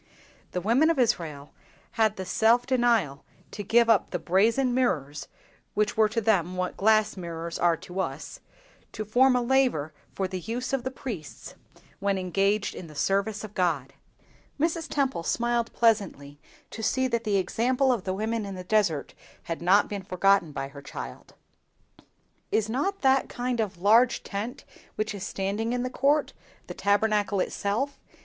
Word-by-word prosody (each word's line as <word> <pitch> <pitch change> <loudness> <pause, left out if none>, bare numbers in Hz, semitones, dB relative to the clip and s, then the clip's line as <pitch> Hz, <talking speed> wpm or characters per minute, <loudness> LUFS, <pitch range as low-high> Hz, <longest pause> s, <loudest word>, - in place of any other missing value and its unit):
The 180 - -1
women 240 - +3
of 330 - +1
Israel 165 - -1 0.4
had 220 -2 +2
the 190 - -5
self 230 +5 +3
denial 235 - +1 0.3
to 205 - -6
give 230 +4 +3
up 225 -5 +3
the 180 - -2
brazen 225 +9 +2
mirrors—which 210 - -2
were 220 -1 +4
to 230 - -1
them 185 -5 +1
what 185 0 -2
glass 215 +1 +3
mirrors, 170 -2 -6
are 170 -1 +3
to 180 +4 -8
us—to 215 +3 -7
form 250 +5 +4
a 250 - +1
laver 240 - +1 0.2
for 190 - -1
the 185 0 -5
use 240 +7 -4
of 270 -3 0
the 260 - -2
priests 225 - -8 0.5
when 200 0 0
engaged 195 +3 0
in 175 - -8
the 155 - -13
service 200 +6 0
of 215 -1 -8
God. 155 -9 -1 0.7
Mrs. 330 +1 0
Temple 270 -10 0
smiled 235 +5 0
pleasantly 195 -11 0 0.3
to 225 - -7
see 260 +4 +1
that 235 -2 -1
the 205 -2 +1
example 250 +8 +1
of 225 -6 -3
the 185 -1 -2
women 220 +2 -2
in 200 -1 -6
the 185 - -7
desert 180 -6 0 0.3
had 165 -1 -5
not 190 +4 +4
been 205 -1 -5
forgotten 185 -2 +2
by 135 -1 -5
her 140 0 -11
child. 65 - -9 1.2
"Is 220 -1 +1
not 335 - -2
that 265 -1 +3
kind 245 -1 -2
of 200 -5 -2
large 225 +6 +4
tent 220 +6 -5 0.3
which 215 0 -2
is 200 -2 -6
standing 205 +5 -2
in 245 0 -1
the 255 - -3
court, 285 +3 +1 0.3
the - - -7
Tabernacle 205 +1 +1
itself?" 215 +10 -2
210 Hz, 165 wpm, -27 LUFS, 185-240 Hz, 1.2 s, were